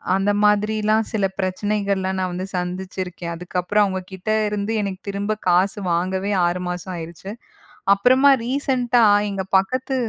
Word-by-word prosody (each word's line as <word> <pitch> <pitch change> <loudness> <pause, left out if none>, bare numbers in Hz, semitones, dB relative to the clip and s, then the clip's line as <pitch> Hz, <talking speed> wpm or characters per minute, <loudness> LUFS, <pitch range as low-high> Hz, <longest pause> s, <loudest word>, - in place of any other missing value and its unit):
அந்த 195 +1 +1
மாதிரில்லாம் 215 +1 +2
சில 205 -3 +1
பிரச்சனைகள்லாம் 195 0 -1
நான் 185 -1 -1
வந்து 185 +2 -4
சந்திச்சிருக்கேன். 180 -1 -4
அதுக்கப்புறம் 180 +4 0
அவுங்ககிட்ட 190 +1 -4 0.2
இருந்து 205 +1 -2
எனக்குத் 195 -1 -5
திரும்பக் 205 +2 -3
காசு 185 +4 +2
வாங்கவே 185 +3 -1 0.2
6 175 +1 -2
மாசம் 180 +1 -5
ஆயிருச்சு. 170 +4 -8 0.6
அப்புறமா 255 +7 +4 0.2
ரீசன்ட்டா 250 -2 +1 0.3
எங்க 195 -1 -3
பக்கத்து 255 +7 -1
195 Hz, 125 wpm, -21 LUFS, 185-210 Hz, 0.6 s, அப்புறமா